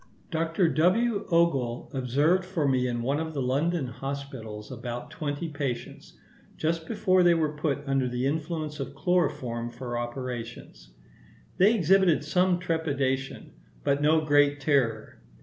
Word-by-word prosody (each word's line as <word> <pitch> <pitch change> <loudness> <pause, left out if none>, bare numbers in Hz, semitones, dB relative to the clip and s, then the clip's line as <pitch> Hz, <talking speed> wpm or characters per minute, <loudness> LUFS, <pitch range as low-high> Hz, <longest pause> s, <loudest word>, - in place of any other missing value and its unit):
Dr. 165 +2 +1
W. 195 - +2
Ogle 140 -9 +1
observed 145 +8 +2
for 180 -5 -1
me 130 -2 +2
in 120 -1 -2
one 140 +4 0
of 160 -1 -4
the 140 - -1
London 145 +5 0
hospitals 125 -4 -6
about 120 0 -6
twenty 150 +1 -3
patients, 140 -5 -5 0.4
just 160 +1 -1
before 185 -4 +2
they 175 -1 +5
were 155 -2 0
put 145 -2 -1
under 135 -2 +1
the 125 +1 -2
influence 155 +1 -2
of 140 0 -5
chloroform 130 -8 0
for 120 -1 -5
operations. 120 - -6 0.7
They 205 +5 +5
exhibited 190 -4 +4
some 180 +3 +2
trepidation, 140 -6 -2 0.3
but 140 +1 +1
no 155 +2 +4
great 145 -1 +4
terror. 130 -7 0
145 Hz, 135 wpm, -27 LUFS, 130-165 Hz, 0.7 s, they